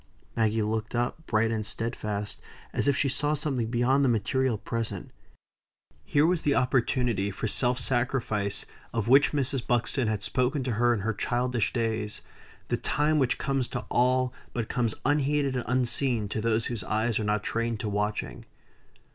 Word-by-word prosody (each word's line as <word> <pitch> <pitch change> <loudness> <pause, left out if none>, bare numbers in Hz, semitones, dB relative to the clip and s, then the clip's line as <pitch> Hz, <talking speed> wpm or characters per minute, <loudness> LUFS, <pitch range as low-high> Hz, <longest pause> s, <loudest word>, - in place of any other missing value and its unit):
Maggie 110 -1 +1
looked 110 +2 -2
up 120 +7 -2
bright 115 0 +2
and 110 -1 -1
steadfast, 105 -2 -3 0.3
as - - 0
if 140 -1 +3
she 140 - +2
saw 145 +3 +1
something 135 -6 -1
beyond 125 +4 +2
the 135 - +3
material 120 +2 +1
present. 110 -3 -4 0.9
Here 145 +1 +3
was 175 0 +2
the 145 -1 +2
opportunity 125 -5 +1
for 100 +2 -3
self 125 +3 +2
sacrifice 120 -6 0 0.3
of 115 -2 -1
which 135 +4 +6
Mrs. 135 -3 0
Buxton 120 +1 +1
had 105 -2 -1
spoken 130 +4 0
to 125 - -2
her 120 +2 +3
in 105 - -3
her 115 +3 -1
childish 120 +2 0
days 110 -3 -2 0.5
the - - +1
time 150 +1 +1
which 130 -3 +2
comes 135 -2 0
to - - -5
all, 125 +1 +2 0.2
but 115 -3 -3
comes 120 -4 0
unheeded 145 -1 +1
and 125 - -2
unseen 125 -2 +1
to 110 - -2
those 115 0 +1
whose 115 -5 -2
eyes 110 +1 0
are - - -1
not 105 0 0
trained 115 0 -1
to - - -3
watching. 105 +1 -2
120 Hz, 170 wpm, -27 LUFS, 110-130 Hz, 0.9 s, which